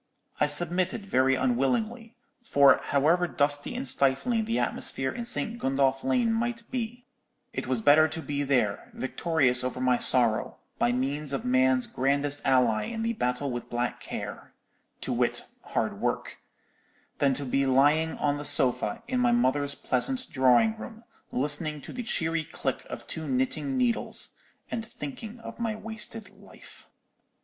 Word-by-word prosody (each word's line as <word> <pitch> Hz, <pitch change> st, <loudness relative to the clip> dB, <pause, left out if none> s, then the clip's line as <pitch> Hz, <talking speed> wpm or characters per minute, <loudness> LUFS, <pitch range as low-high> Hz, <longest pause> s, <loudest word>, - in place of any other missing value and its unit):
I 150 Hz, -, +3 dB
submitted, 175 Hz, +7 st, +1 dB
very 130 Hz, -7 st, +2 dB
unwillingly; 215 Hz, -, -1 dB, 0.3 s
for 140 Hz, -, +5 dB
however 160 Hz, +6 st, +2 dB
dusty 145 Hz, -, 0 dB
and 260 Hz, +2 st, -2 dB
stifling 220 Hz, -, +2 dB
the 230 Hz, +1 st, -1 dB
atmosphere 135 Hz, 0 st, 0 dB
in 235 Hz, -1 st, -6 dB
St. 235 Hz, -1 st, -2 dB
Gundolph 135 Hz, -, +1 dB
Lane 250 Hz, -4 st, +2 dB
might 235 Hz, +1 st, -2 dB
be, 245 Hz, 0 st, -4 dB, 0.5 s
it -, -, -4 dB
was -, -, 0 dB
better 155 Hz, 0 st, +6 dB
to 160 Hz, +2 st, -6 dB
be 145 Hz, 0 st, -2 dB
there, 125 Hz, -8 st, 0 dB
victorious 130 Hz, -3 st, 0 dB
over 125 Hz, 0 st, -3 dB
my 125 Hz, -1 st, +2 dB
sorrow, 120 Hz, -4 st, +2 dB, 0.2 s
by 120 Hz, -, +3 dB
means 140 Hz, +3 st, -2 dB
of 135 Hz, -, -3 dB
man's 130 Hz, 0 st, +3 dB
grandest 140 Hz, +2 st, 0 dB
ally 115 Hz, -5 st, +2 dB
in 225 Hz, -, -4 dB
the 230 Hz, 0 st, 0 dB
battle 125 Hz, -, -2 dB
with 120 Hz, -1 st, -5 dB
black 120 Hz, 0 st, -2 dB
care—to -, -, -8 dB
wit, -, -, 0 dB, 0.2 s
hard -, -, -3 dB
work—than 140 Hz, -2 st, -4 dB
to 145 Hz, -, -4 dB
be 135 Hz, +1 st, +1 dB
lying 145 Hz, +5 st, +3 dB
on 145 Hz, -1 st, 0 dB
the 145 Hz, -, -6 dB
sofa 145 Hz, -, +2 dB
in 255 Hz, -, -1 dB
my 245 Hz, -1 st, +3 dB
mother's 145 Hz, -, +1 dB
pleasant 255 Hz, -, -1 dB
drawing 130 Hz, -, +4 dB
room, 225 Hz, -1 st, -9 dB, 0.3 s
listening 150 Hz, +3 st, 0 dB
to -, -, -10 dB
the 250 Hz, -, -4 dB
cheery 165 Hz, -8 st, -1 dB
click -, -, -4 dB
of -, -, -7 dB
two 160 Hz, -1 st, -5 dB
knitting 130 Hz, -, -1 dB
needles, 245 Hz, -2 st, 0 dB, 0.4 s
and 230 Hz, -, -2 dB
thinking 220 Hz, -, -8 dB
of -, -, -9 dB
my 225 Hz, -2 st, -1 dB
wasted 220 Hz, 0 st, -4 dB
life. -, -, -15 dB
145 Hz, 150 wpm, -27 LUFS, -, 0.5 s, better